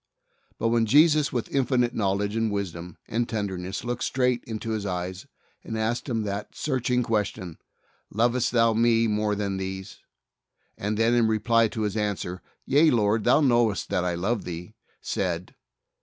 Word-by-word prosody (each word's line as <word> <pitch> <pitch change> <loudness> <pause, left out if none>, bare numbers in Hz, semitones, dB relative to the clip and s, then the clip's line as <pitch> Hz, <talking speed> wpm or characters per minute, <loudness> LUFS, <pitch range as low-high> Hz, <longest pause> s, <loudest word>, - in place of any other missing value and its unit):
But 115 - 0
when 115 -1 +2
Jesus, 150 +4 +5
with 120 -5 -3
infinite 125 -3 +1
knowledge 100 0 0
and 115 -1 0
wisdom 90 -4 -5
and 120 +1 -1
tenderness, 95 -3 -3
looked 120 0 -3
straight 125 -2 +1
into 110 0 -5
his 110 -2 -2
eyes 90 -1 -4 0.4
and 110 - -5
asked 115 +5 -1
him 115 -3 -1
that 100 0 -5
searching 125 -3 0
question, 105 -6 -2 0.5
"Lovest 120 +3 +1
thou 115 -1 +4
Me 115 0 +3
more 105 -1 0
than 100 -2 -2
these?" 95 0 -6 0.8
and 105 +1 -2
then 115 +2 +3
in 120 -2 +4
reply 115 +1 +3
to 110 - -5
his 105 -1 -2
answer, 100 -4 -2 0.2
"Yea, 150 +4 +5
Lord,. 110 -3 +2
Thou 155 - +5
knowest 120 -6 +2
that 90 -3 0
I 90 -1 -1
love 100 +6 -1
Thee," 90 +3 -7 0.3
said 90 -2 -3
110 Hz, 160 wpm, -26 LUFS, 100-120 Hz, 0.8 s, Jesus